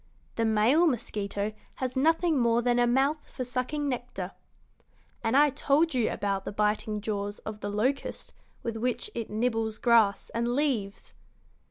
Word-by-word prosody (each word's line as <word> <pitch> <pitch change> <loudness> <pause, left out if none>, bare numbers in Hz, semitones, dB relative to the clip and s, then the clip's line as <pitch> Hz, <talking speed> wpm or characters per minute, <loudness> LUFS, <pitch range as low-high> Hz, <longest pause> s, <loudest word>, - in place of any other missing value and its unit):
The 230 - +1
male 225 +10 +4
mosquito 210 -5 -2 0.2
has 255 0 -3
nothing 325 +2 +3
more 235 0 +3
than 245 0 +2
a 240 - +4
mouth 275 +5 +1
for 255 - -5
sucking 255 +4 -2
nectar. 245 -8 -4 0.9
And 225 +3 +2
I 295 0 +6
told 300 +5 +2
you 245 -4 +2
about 195 -1 -2
the - - -5
biting 210 0 0
jaws 205 -1 -3
of 215 -1 -6
the 205 - -4
locust 250 +7 -2 0.3
with 230 -2 -3
which 245 +1 -2
it 230 -2 -4
nibbles 225 0 -1
grass 225 -5 +3
and 235 +1 -1
leaves." 240 -9 -1
235 Hz, 155 wpm, -28 LUFS, 210-260 Hz, 0.9 s, I